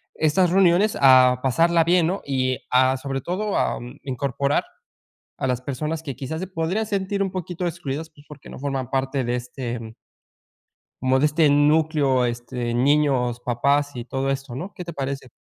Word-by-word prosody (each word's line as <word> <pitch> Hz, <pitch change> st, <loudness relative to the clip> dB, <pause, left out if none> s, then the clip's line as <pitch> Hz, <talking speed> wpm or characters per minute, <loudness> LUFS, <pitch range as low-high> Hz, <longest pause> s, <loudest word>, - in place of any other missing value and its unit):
estas 165 Hz, +3 st, +2 dB
reuniones 190 Hz, +2 st, +3 dB
a 130 Hz, -2 st, +6 dB
pasarla 165 Hz, +5 st, +3 dB
bien, 175 Hz, 0 st, +3 dB
¿no? 190 Hz, +3 st, -2 dB
Y 130 Hz, -2 st, 0 dB
a 130 Hz, +1 st, +4 dB
sobre 135 Hz, 0 st, -4 dB
todo, 200 Hz, +6 st, -2 dB
a, -, -, 0 dB
mm, 125 Hz, +4 st, -10 dB
incorporar 140 Hz, +1 st, -1 dB, 0.8 s
a 130 Hz, -, -1 dB
las 125 Hz, -1 st, -1 dB
personas 150 Hz, +5 st, -4 dB
que 140 Hz, -5 st, -5 dB
quizás 140 Hz, +6 st, -5 dB
se 190 Hz, -, -4 dB
podrían 185 Hz, +5 st, -2 dB
sentir 200 Hz, -1 st, -1 dB
un 195 Hz, -, -3 dB
poquito 180 Hz, -1 st, -4 dB
excluidas, 155 Hz, -1 st, -5 dB
pues, 145 Hz, -1 st, -19 dB
porque 150 Hz, -2 st, -12 dB
no -, -, -9 dB
forman 135 Hz, -3 st, -3 dB
parte 135 Hz, 0 st, -1 dB
de 120 Hz, +1 st, 0 dB
este, 125 Hz, -1 st, -5 dB
mm 110 Hz, -1 st, -9 dB, 1.1 s
como 130 Hz, +1 st, +2 dB
de 150 Hz, -, +4 dB
este 150 Hz, +1 st, +3 dB
núcleo, 145 Hz, -3 st, +3 dB
este, 120 Hz, 0 st, -3 dB
niños, 130 Hz, -2 st, +2 dB
papás 140 Hz, +4 st, 0 dB
y 120 Hz, -, -5 dB
todo 135 Hz, +1 st, -2 dB
esto, 135 Hz, -2 st, -4 dB
¿no? 180 Hz, +9 st, -6 dB
¿Qué 180 Hz, -, -7 dB
te 170 Hz, -, -7 dB
parece? 135 Hz, -2 st, -4 dB
140 Hz, 180 wpm, -23 LUFS, 130-165 Hz, 1.1 s, a